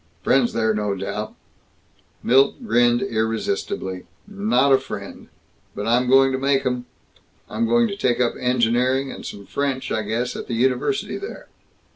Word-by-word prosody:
"Friends 130 -3 +2
there, 110 -1 +1
no 105 -2 -1
doubt?" 105 +3 -5 0.9
Milt 135 - +3
grinned 120 - +3
irresistibly. 110 -4 -2 0.2
"Not 200 - +2
a 135 - +5
friend. 135 - -8 0.5
But 105 - -4
I'm 125 +2 +2
going 135 0 +5
to 130 - -1
make 135 0 +1
'em. 125 -1 -2 0.6
I'm 230 - -1
going 235 0 +3
to 200 - -4
take 125 -11 0
up 120 -1 +2
engineering, 125 +2 +1
and - - -9
some 100 -1 -8
French, 140 +1 -2
I 110 - 0
guess, 115 +4 -2
at - - -6
the 120 - -3
university 130 - 0
there." 400 - -9
125 Hz, 155 wpm, -22 LUFS, 115-135 Hz, 0.9 s, a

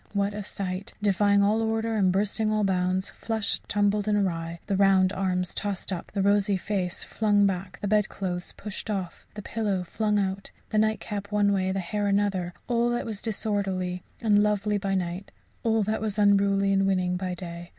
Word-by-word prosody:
What 200 0 0
a 210 - -4
sight! 195 -1 -4
defying 200 0 +4
all 215 +2 +3
order 225 0 0
and 190 -3 +3
bursting 210 +3 0
all 215 -1 +1
bounds, 185 0 0
flushed, 220 -2 -2
tumbled 205 0 +1
and 210 -1 +3
awry 170 -4 -1
the 200 - 0
round 190 -1 +4
arms 180 -1 -1
tossed 200 -2 -3
up, 175 - -6
the 195 - +1
rosy 200 0 +3
face 185 -1 -2
flung 205 -2 +2
back, 190 -1 -2
the 205 - -1
bedclothes 195 -3 -1
pushed 210 +1 -7
off, 190 -4 -4
the 210 - -7
pillow 205 -4 -1
flung 210 +3 0
out, 195 -1 -2 0.2
the 215 - +2
nightcap 210 -1 -1
one 205 -1 +3
way, 190 -1 +1
the 195 - -1
hair 205 +3 -2
another 200 -3 +1 0.2
all 240 -1 +2
that 240 0 -1
was 215 -3 -5
disorderly 195 -4 -2 0.2
and 210 -3 +4
lovely 210 0 +1
by 195 -1 -1
night, 180 +1 -3 0.3
all 225 -2 +2
that 215 +2 -1
was 215 -1 -2
unruly 200 -1 +3
and 195 0 +3
winning 185 -2 +1
by 180 0 -3
day. 170 -1 -8
200 Hz, 185 wpm, -27 LUFS, 185-210 Hz, 0.3 s, defying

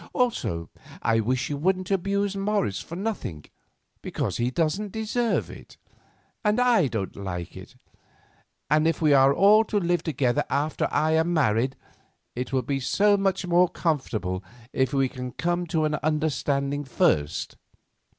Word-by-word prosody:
Also, 85 - -1 0.3
I 115 0 +3
wish 125 +5 -1
you 145 - -2
wouldn't 185 +4 0
abuse 200 +1 0
Morris 195 - -1
for 170 - -8
nothing, 185 - -4 0.6
because - - -3
he 120 +1 0
doesn't 170 +9 -1
deserve 220 +2 -1
it, - - -13 0.7
and 210 +2 +2
I 240 - +4
don't 110 -6 -4
like 90 -3 -6
it; - - -11 0.9
and 155 +1 +3
if 165 - 0
we 155 -3 +4
are 135 0 +6
all 205 +8 +5
to 210 - -1
live 175 -2 +1
together 145 -3 0
after 150 +2 0
I 155 +2 +2
am 160 +2 +2
married, 130 -2 +1 0.6
it 125 +3 -4
will 130 -1 +1
be 135 +3 -1
so 205 +10 +3
much 195 -1 0
more 175 0 +4
comfortable 110 - -2 0.3
if 130 +1 +1
we 135 -2 +2
can 125 -1 -7
come 175 +1 -1
to 160 -2 0
an 150 - 0
understanding 145 -2 0
first." 75 - 0
155 Hz, 150 wpm, -25 LUFS, 130-190 Hz, 0.9 s, are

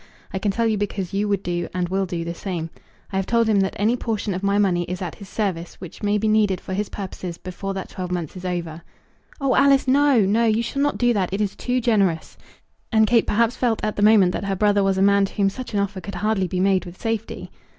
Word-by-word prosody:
I 190 - -1
can 205 - 0
tell 230 +4 0
you 220 -2 +1
because 195 -3 -3
you 205 +1 0
would 200 -2 0
do, 175 -1 -2
and 180 -1 0
will 190 +1 -1
do 170 -2 -4
the 170 - -3
same. 170 -3 -5 0.4
I - - 0
have 195 - -1
told 230 -1 +2
him 210 -2 +3
that 195 0 0
any 215 +4 +2
portion 220 -4 -2
of 180 - -4
my 200 0 +1
money 190 -4 +2
is 180 +1 -5
at 180 -3 -4
his 200 - -12
service 185 -6 -3
which 180 -1 -11
may 205 0 +1
be 215 +1 0
needed 210 -4 +2
for 190 - -7
his 205 +2 -2
purposes 185 -3 -6
before 195 +2 -6
that 190 - -5
twelve 180 -1 -6
months 175 -3 -3
is 185 - -8
over." 170 -3 -4 0.6
"Oh, 275 -2 +1
Alice! 275 -1 +4
No; 275 -2 +4
no. 220 +4 +2
You 225 +1 +2
shall 275 +4 -3
not 290 0 +1
do 245 -1 +3
that. 190 -4 -1
It 195 - -2
is 205 -2 -1
too 250 0 -1
generous." 200 -9 +1 0.6
And 220 -1 +5
Kate 230 0 +3
perhaps 230 +3 +2
felt 235 -3 0
at 215 0 -1
the - - -2
moment 205 -4 +6
that 200 - -4
her 195 -1 -1
brother 205 0 +3
was 195 -1 +1
a 190 - +3
man 200 0 +4
to - - -8
whom 195 -1 +2
such 250 -1 -7
an - - +2
offer 200 -1 -2
could 200 +2 -7
hardly 210 -3 0
be 180 +1 -3
made 190 0 +2
with 175 +1 -11
safety. 225 -1 -4
200 Hz, 260 wpm, -22 LUFS, 185-220 Hz, 0.6 s, moment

